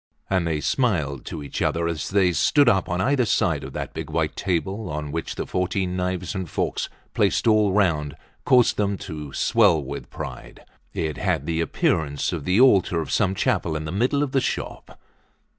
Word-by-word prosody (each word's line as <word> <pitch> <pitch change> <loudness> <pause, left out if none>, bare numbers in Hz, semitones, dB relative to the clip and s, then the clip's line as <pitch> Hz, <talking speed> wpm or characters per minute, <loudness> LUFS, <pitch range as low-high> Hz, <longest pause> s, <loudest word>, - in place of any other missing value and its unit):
And 95 -3 +1
they 80 -2 -1
smiled 75 - 0
to 75 - -6
each 70 - -5
other 85 0 +1
as 80 -2 -3
they 95 -2 +3
stood 145 - +3
up 95 -5 +3
on 90 +1 -1
either 130 +6 +2
side 115 - +1
of - - -8
that - - -5
big - - -6
white - - -1
table 95 +3 -2
on 75 -1 -4
which 80 +1 -4
the - - -3
fourteen 90 0 -1
knives 90 -1 -2
and 95 -4 -4
forks, - - -2 0.2
placed - - +1
all 110 -2 +4
round, 80 -8 +1 0.3
caused 125 -2 +4
them 100 -1 0
to 75 -5 -7
swell 100 -8 +3
with 70 -2 -7
pride. - - -8 0.3
It 80 -3 -3
had 70 - -1
the 80 +1 -1
appearance 75 -2 0
of - - -4
the 90 +4 +2
altar 100 -9 +5
of 80 - -4
some 95 -2 +1
chapel 95 -8 0
in 80 0 -3
the 75 - -4
middle 125 +9 +1
of 140 - -3
the 135 - +2
shop. - - -5
90 Hz, 190 wpm, -24 LUFS, 80-105 Hz, 0.3 s, altar